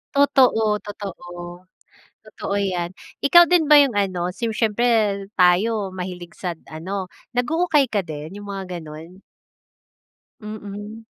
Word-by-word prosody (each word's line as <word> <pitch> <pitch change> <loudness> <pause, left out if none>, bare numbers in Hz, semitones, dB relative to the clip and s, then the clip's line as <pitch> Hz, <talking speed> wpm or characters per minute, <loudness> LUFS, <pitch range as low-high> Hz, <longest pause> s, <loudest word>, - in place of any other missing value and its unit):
Totoo, 250 -7 +4
totoo. 205 -3 -8 1.0
Totoo 200 - -5
'yan. 180 -3 -1 0.3
Ikaw 345 +5 +7
din 335 -3 +2
ba 300 - +9
yung 280 -5 +5
ano, 185 -3 -1
si 230 +2 -2
siyempre 220 -2 +1
tayo 190 +2 +3
mahilig 180 -2 -7
sa 175 -3 -5 0.2
ano, 190 +4 -4 0.3
nag-uukay 310 +2 +2
ka 210 -5 -1
din, 155 0 -8
yung 205 - -9
mga 190 -2 -5
gano'n? 160 +5 -11 1.2
Mm. 210 +1 -8
205 Hz, 120 wpm, -22 LUFS, 180-230 Hz, 1.2 s, ba